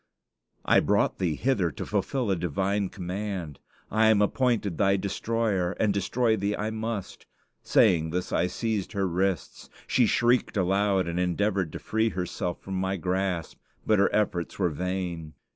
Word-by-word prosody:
"I -, -, +5 dB
brought -, -, +1 dB
thee 85 Hz, -5 st, 0 dB
hither 105 Hz, -, +1 dB
to -, -, -6 dB
fulfill 105 Hz, +3 st, -1 dB
a -, -, +2 dB
divine 95 Hz, +4 st, -1 dB
command. 90 Hz, -4 st, -5 dB, 0.3 s
I 110 Hz, +1 st, +4 dB
am 110 Hz, -2 st, +5 dB
appointed 105 Hz, -, +1 dB
thy 100 Hz, -1 st, +3 dB
destroyer, 100 Hz, -2 st, -1 dB
and 105 Hz, -1 st, +1 dB
destroy 110 Hz, +4 st, +1 dB
thee 100 Hz, 0 st, -1 dB
I 105 Hz, +1 st, -2 dB
must." 110 Hz, -2 st, -5 dB, 0.3 s
Saying 80 Hz, -2 st, +3 dB
this, 90 Hz, +2 st, -3 dB
I 90 Hz, -, +2 dB
seized 105 Hz, +2 st, -2 dB
her 100 Hz, -2 st, 0 dB
wrists. 95 Hz, +1 st, -2 dB, 0.2 s
She 125 Hz, -3 st, +3 dB
shrieked 120 Hz, 0 st, +2 dB
aloud, 95 Hz, 0 st, +2 dB
and 85 Hz, +1 st, -2 dB
endeavored 90 Hz, 0 st, 0 dB
to -, -, -4 dB
free 110 Hz, +1 st, 0 dB
herself 90 Hz, -2 st, -3 dB
from 95 Hz, -1 st, -3 dB
my 95 Hz, +1 st, -1 dB
grasp; 90 Hz, -1 st, -2 dB, 0.3 s
but 110 Hz, -2 st, +3 dB
her 100 Hz, -, +4 dB
efforts 100 Hz, -5 st, -1 dB
were 90 Hz, -3 st, +2 dB
vain. 90 Hz, -1 st, -4 dB
95 Hz, 160 wpm, -27 LUFS, 90-105 Hz, 0.3 s, I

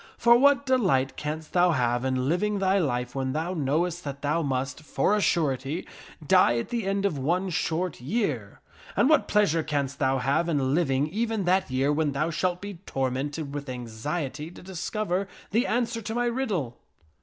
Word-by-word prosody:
For 235 Hz, 0 st, +6 dB
what 280 Hz, +2 st, +4 dB
delight 185 Hz, -, +2 dB
canst 155 Hz, +1 st, -5 dB
thou 180 Hz, -1 st, +4 dB
have 120 Hz, -2 st, +1 dB
in 130 Hz, -1 st, 0 dB
living 205 Hz, +6 st, +1 dB
thy 195 Hz, 0 st, +2 dB
life 125 Hz, -6 st, -1 dB
when 130 Hz, -1 st, -2 dB
thou 165 Hz, +4 st, -2 dB
knowest 170 Hz, +3 st, 0 dB
that 140 Hz, 0 st, -6 dB
thou 150 Hz, +3 st, +1 dB
must, 135 Hz, -1 st, -2 dB
for 155 Hz, +7 st, +1 dB
a 210 Hz, -, +1 dB
surety, 145 Hz, -2 st, 0 dB, 0.4 s
die 185 Hz, -10 st, +5 dB
at 115 Hz, -, -3 dB
the 230 Hz, -5 st, -2 dB
end 195 Hz, 0 st, 0 dB
of 160 Hz, -8 st, 0 dB
one 180 Hz, +7 st, 0 dB
short 165 Hz, -2 st, -1 dB
year? 135 Hz, -, -2 dB, 0.3 s
And 245 Hz, -, +4 dB
what 310 Hz, -, +4 dB
pleasure 200 Hz, -6 st, +3 dB
canst 140 Hz, -3 st, -2 dB
thou 135 Hz, -1 st, +2 dB
have 140 Hz, +7 st, +1 dB
in 140 Hz, -4 st, +1 dB
living 140 Hz, -4 st, +2 dB
even 220 Hz, +1 st, -1 dB
that 185 Hz, -1 st, +2 dB
year 135 Hz, +3 st, +1 dB
when 150 Hz, -1 st, 0 dB
thou 155 Hz, +5 st, 0 dB
shalt 180 Hz, +2 st, -1 dB
be 200 Hz, -3 st, -7 dB
tormented 140 Hz, +3 st, -2 dB
with 145 Hz, -1 st, -5 dB
anxiety 130 Hz, +5 st, -4 dB
to 175 Hz, -, -13 dB
discover 190 Hz, +1 st, -2 dB, 0.2 s
the 235 Hz, +6 st, +2 dB
answer 230 Hz, 0 st, 0 dB
to 220 Hz, +1 st, -5 dB
my 245 Hz, 0 st, +1 dB
riddle?" 210 Hz, -, -2 dB
160 Hz, 180 wpm, -26 LUFS, 135-195 Hz, 0.4 s, For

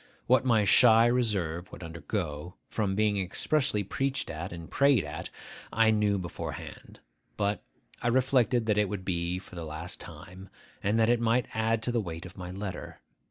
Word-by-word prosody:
What 130 Hz, +1 st, +4 dB
my 115 Hz, -5 st, +3 dB
shy 115 Hz, +2 st, +7 dB
reserve 105 Hz, -7 st, 0 dB
would 90 Hz, -, -9 dB
undergo, 85 Hz, 0 st, -4 dB, 0.2 s
from 100 Hz, -3 st, 0 dB
being 105 Hz, -1 st, +2 dB
expressly 105 Hz, -, +1 dB
preached 135 Hz, +7 st, -2 dB
at 80 Hz, +3 st, -5 dB
and 85 Hz, -1 st, -8 dB
prayed 140 Hz, -7 st, +3 dB
at, -, -, -6 dB, 0.4 s
I 110 Hz, 0 st, +4 dB
knew 105 Hz, -2 st, +2 dB
beforehand. 85 Hz, -3 st, -7 dB, 0.4 s
But 100 Hz, -1 st, 0 dB, 0.4 s
I -, -, -1 dB
reflected 125 Hz, -1 st, +3 dB
that 105 Hz, -1 st, +2 dB
it 105 Hz, -2 st, +2 dB
would 100 Hz, -3 st, -5 dB
be 85 Hz, 0 st, -1 dB
for 95 Hz, -, -12 dB
the 85 Hz, -, -5 dB
last 80 Hz, +3 st, -5 dB
time, 90 Hz, +4 st, -10 dB, 0.3 s
and 105 Hz, +3 st, +1 dB
that 110 Hz, 0 st, +4 dB
it 120 Hz, -, +2 dB
might 120 Hz, +2 st, +2 dB
add 110 Hz, 0 st, +1 dB
to 120 Hz, -, +1 dB
the 120 Hz, -1 st, +1 dB
weight 85 Hz, -3 st, -6 dB
of 90 Hz, -, -11 dB
my 90 Hz, -1 st, -7 dB
letter. 90 Hz, -4 st, -6 dB
100 Hz, 175 wpm, -29 LUFS, 90-115 Hz, 0.4 s, shy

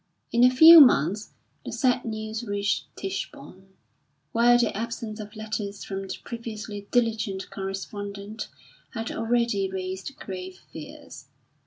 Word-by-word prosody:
In 235 Hz, +1 st, +3 dB
a 250 Hz, -, +8 dB
few 320 Hz, +6 st, +10 dB
months 210 Hz, -, +4 dB, 0.3 s
the -, -, -6 dB
sad 250 Hz, -3 st, +1 dB
news 220 Hz, 0 st, -4 dB
reached 205 Hz, -2 st, -1 dB
Tichborne, 190 Hz, -1 st, -6 dB, 0.6 s
where 240 Hz, +1 st, +5 dB
the 240 Hz, -2 st, +1 dB
absence 225 Hz, 0 st, -5 dB
of 210 Hz, 0 st, -9 dB
letters 210 Hz, -2 st, -5 dB
from 195 Hz, -1 st, -5 dB
the -, -, -5 dB
previously 215 Hz, -3 st, -7 dB
diligent 220 Hz, -5 st, 0 dB
correspondent 200 Hz, +2 st, -6 dB, 0.5 s
had 225 Hz, 0 st, -3 dB
already 225 Hz, -4 st, 0 dB
raised 190 Hz, +6 st, -5 dB
grave 185 Hz, -1 st, -7 dB
fears. 150 Hz, -4 st, -10 dB
215 Hz, 125 wpm, -26 LUFS, 195-230 Hz, 0.6 s, few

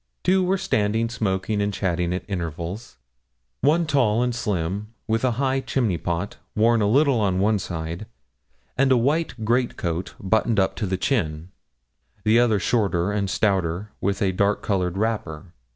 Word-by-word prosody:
Two 190 Hz, +1 st, +3 dB
were 185 Hz, +2 st, +1 dB
standing 115 Hz, -, 0 dB
smoking 105 Hz, -2 st, -1 dB
and 100 Hz, 0 st, 0 dB
chatting 90 Hz, -3 st, -1 dB
at 90 Hz, -, -3 dB
intervals: 85 Hz, -, -5 dB, 0.6 s
one 160 Hz, +5 st, +3 dB
tall 120 Hz, -7 st, +2 dB
and 125 Hz, -1 st, 0 dB
slim, 100 Hz, -1 st, -2 dB, 0.2 s
with 115 Hz, +2 st, 0 dB
a 125 Hz, -2 st, +2 dB
high 135 Hz, 0 st, +1 dB
chimney 125 Hz, -8 st, -1 dB
pot, 85 Hz, +3 st, -3 dB, 0.2 s
worn 115 Hz, +1 st, +3 dB
a 100 Hz, -, +2 dB
little 140 Hz, 0 st, +4 dB
on 95 Hz, -3 st, +1 dB
one 105 Hz, +1 st, +2 dB
side, 80 Hz, -2 st, -5 dB, 0.7 s
and 135 Hz, 0 st, +3 dB
a 130 Hz, -, +6 dB
white 135 Hz, -2 st, 0 dB
great 120 Hz, +2 st, +1 dB
coat 85 Hz, +1 st, -3 dB
buttoned 110 Hz, +2 st, +1 dB
up 95 Hz, -, +1 dB
to 105 Hz, -, -2 dB
the 95 Hz, 0 st, -1 dB
chin; 90 Hz, -, -1 dB, 0.7 s
the 110 Hz, +2 st, +4 dB
other 120 Hz, -3 st, +3 dB
shorter 100 Hz, -4 st, +1 dB
and 100 Hz, -2 st, -1 dB
stouter, 95 Hz, -1 st, 0 dB
with 100 Hz, +1 st, 0 dB
a 95 Hz, -, +2 dB
dark 100 Hz, +2 st, +1 dB
coloured 90 Hz, -3 st, 0 dB
wrapper. 95 Hz, -6 st, -3 dB
105 Hz, 165 wpm, -23 LUFS, 95-120 Hz, 0.7 s, a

